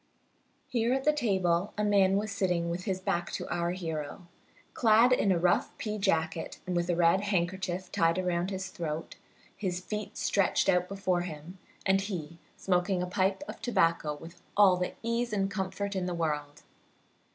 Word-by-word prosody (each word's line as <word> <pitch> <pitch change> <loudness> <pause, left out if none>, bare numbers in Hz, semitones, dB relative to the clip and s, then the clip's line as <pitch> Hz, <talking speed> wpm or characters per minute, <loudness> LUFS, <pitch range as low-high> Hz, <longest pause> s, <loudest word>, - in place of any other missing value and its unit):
Here 235 0 +1
at 265 0 0
the 300 - +4
table 190 - +1
a 210 - 0
man 195 -2 +4
was 210 +1 -2
sitting 180 -4 0
with 180 +1 -4
his 190 -2 -1
back 175 -2 -1
to - - -4
our 170 0 0
hero, 165 -1 -4 0.5
clad 230 +1 +5
in 205 -5 +3
a 180 - +3
rough 175 +1 +1
pea 215 -1 -3
jacket, 160 -3 0
and 180 -1 -2
with 175 0 0
a 175 - +2
red 170 +2 +4
handkerchief 185 -1 -1
tied 165 +1 +2
around 180 -1 0
his 190 -1 -4
throat, 165 -5 -5 0.4
his 180 -4 -2
feet 210 +3 -5
stretched 200 -2 +2
out 180 -1 +3
before 190 -3 0
him, 175 +1 -8 0.3
and 195 0 +3
he 170 -5 -5 0.2
smoking 180 0 +1
a - - -1
pipe 190 +6 0
of - - -8
tobacco 165 -9 +1
with 165 +3 -12 0.2
all 200 -3 +7
the 180 0 -3
ease 235 +1 -1
and 195 -1 0
comfort 195 +1 -3
in 185 -1 -1
the 175 - -2
world. 150 -3 -3
185 Hz, 175 wpm, -30 LUFS, 170-200 Hz, 0.5 s, all